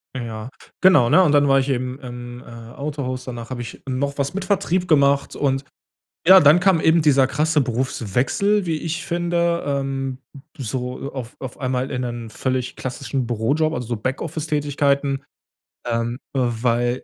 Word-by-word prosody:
Ja 115 -2 -5 0.3
genau, 185 -11 +6
ne? 185 - +6
Und 150 - +3
dann 145 0 +5
war 135 0 +5
ich 135 +1 -1
eben 130 0 -2
im, 120 -1 -8
äh, - - -16 0.3
Autohaus. 140 -3 -4
Danach 120 -2 -7
habe 130 -2 -4
ich 115 -2 -8
noch 140 +2 -2
was 140 -1 -1
mit 195 0 -3
Vertrieb 185 -2 0
gemacht 140 -2 +3
und 135 -1 0 0.6
ja, 190 +1 +9
dann 150 +1 +7
kam 180 -2 +3
eben 160 +1 +4
dieser 135 -3 +4
krasse 155 +1 +1
Berufswechsel, 130 - 0
wie 160 -2 0
ich 160 +1 -4
finde, 170 0 0
ähm, 135 -2 -2 0.4
so 130 +2 -4
auf 125 -3 -7
auf 130 -2 -8
einmal 130 0 -1
in 125 -1 -2
einen 120 -2 -5
völlig 130 +1 -2
klassischen 130 0 -3
Bürojob, 140 +8 +1
also, 125 -4 -4
so 120 +1 -2
Backoffice-Tätigkeiten, 145 +1 -1 0.6
ähm, 115 0 -1 0.2
weil 120 -1 0
135 Hz, 160 wpm, -22 LUFS, 125-150 Hz, 0.6 s, ja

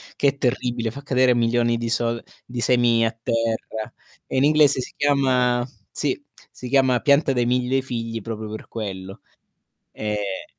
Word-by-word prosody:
che 145 - +2
è 140 - -6
terribile 120 -3 -1
fa 140 - -9
cadere 130 -3 +3
milioni 120 0 +2
di 115 0 -3
sol 115 0 -1 0.2
di 120 0 -5
semi 120 -2 +3
a 115 - +1
terra, 115 -1 -3 0.3
e - - -3
in 130 - +4
inglese 150 -2 +4
si 125 - -5
chiama 130 -4 +2 0.2
sì, - - -2 0.3
si 125 - -8
chiama 130 -2 +3
pianta 140 -1 +4
dei 120 -2 +1
1000 125 +2 +1
figli 115 -3 -4
proprio 110 0 -5
per 110 +1 -8
quello. 95 -3 -6 0.7
Eh, 105 -2 -3
120 Hz, 160 wpm, -23 LUFS, 115-130 Hz, 0.7 s, in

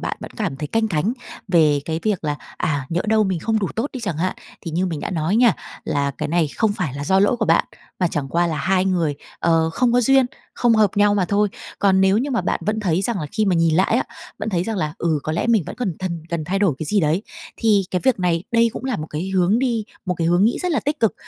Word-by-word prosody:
bạn - - -3
vẫn - - -8
cảm 135 - -2
thấy 150 - -4
canh 225 +8 0
cánh 185 +5 0 0.4
về 155 -5 +4
cái 160 0 -3
việc 205 -7 -1
là, 145 -1 -1 0.2
à, 140 -4 -1
nhỡ 170 +1 -1
đâu 220 -1 +4
mình 190 -3 -1
không 220 +6 0
đủ 200 - -1
tốt 235 +6 -1
đi 255 - -6
chẳng 200 -9 -3
hạn, 185 +3 -1 0.2
thì 165 - -6
như 180 +4 0
mình 160 -4 -3
đã - - -4
nói 170 +4 0
nha, 240 -3 +5 0.3
là 140 -1 0
cái - - -2
này 165 -1 +1
không 220 -3 +2
phải 180 -9 -3
là 140 +1 -4
do 190 +4 +3
lỗi 205 +5 +3
của 225 - 0
bạn, - - +4 0.3
mà 180 - +2
chẳng 145 -4 -3
qua 170 +4 +1
là 160 -2 -2
hai 185 +6 +1
người, 170 -6 +1 0.2
ờ, 165 -1 +2
không 240 +8 +1
có 245 - +4
duyên, 265 +1 +4 0.3
không 240 -2 +3
hợp 215 -3 +4
nhau 205 0 +4
mà 195 -3 +2
thôi. 205 +2 +1 0.3
Còn 190 -1 +3
nếu 190 +2 +4
như 275 +5 -1
mà 240 - +1
bạn - - -1
vẫn 220 +1 0
thấy 185 -3 0
rằng 210 -2 -1
là 150 - -3
khi 215 0 +1
mà 195 -3 +2
nhìn 165 -1 +3
lại 190 +6 +3
á, 255 - +1 0.3
vẫn - - -3
thấy 175 -4 0
rằng 220 +1 -3
là, 155 -5 -2
ừ, 165 -3 +1
có 155 - -3
lẽ 165 - -1
mình 225 -6 +3
vẫn - - -7
cần 200 -10 -2
thần 170 -3 -4
cần 170 -2 -3
thay 190 +5 -1
đổi 195 -8 +2
cái 155 - -4
gì 205 +5 +2
đấy, 160 +4 +1 0.3
thì 215 -4 +3
cái 180 - 0
việc 260 -5 +3
này, 170 -2 +1
đây 230 0 +4
cũng - - -7
là 260 -4 -1
một 155 - -5
cái 170 +6 -3
hướng 190 +3 +2
đi, 240 -4 0 0.2
một 180 - 0
cái 165 -1 -1
hướng 175 +3 +3
nghĩ 230 - +2
rất 360 - 0
là 285 - +1
tích 290 +4 -2
cực 225 - +2
190 Hz, 285 wpm, -21 LUFS, 165-220 Hz, 0.4 s, nha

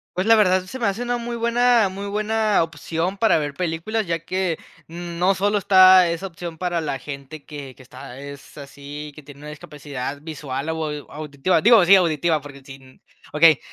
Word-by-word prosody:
Pues 185 - -1
la 225 - +6
verdad, 185 -3 +3
se 260 +8 -8
me 230 - 0
hace 200 +5 -2
una 245 0 -1
muy 235 0 -5
buena 235 -2 +2
muy 200 +2 -7
buena 215 -1 +1
opción 165 +3 -4
para 225 -4 +3
ver 145 -2 -3
películas, 180 +6 -3
ya 165 - 0
que 185 -3 -1 0.3
no 175 +3 -1
solo 205 +1 +1
está 185 -2 +6
esa 170 +3 -4
opción 170 -2 -8
para 175 -1 -2
la 145 -3 -3
gente 140 +3 -9
que 140 -4 -9
que 130 - -16
está 130 0 -11
es 140 0 -11
así, 145 +1 -9
que 155 - -13
tiene 145 0 -15
una 150 - -9
discapacidad 145 -2 -7
visual 150 -2 -5
o 160 -1 -2
au 150 -1 -7
auditiva, 150 +3 -1
digo, 225 -4 +6
sí, 195 +2 +8
auditiva, 165 -3 +1
porque 140 -1 -12
sin 135 -1 -14 0.3
okey. 155 -1 +5
165 Hz, 190 wpm, -22 LUFS, 145-195 Hz, 0.3 s, sí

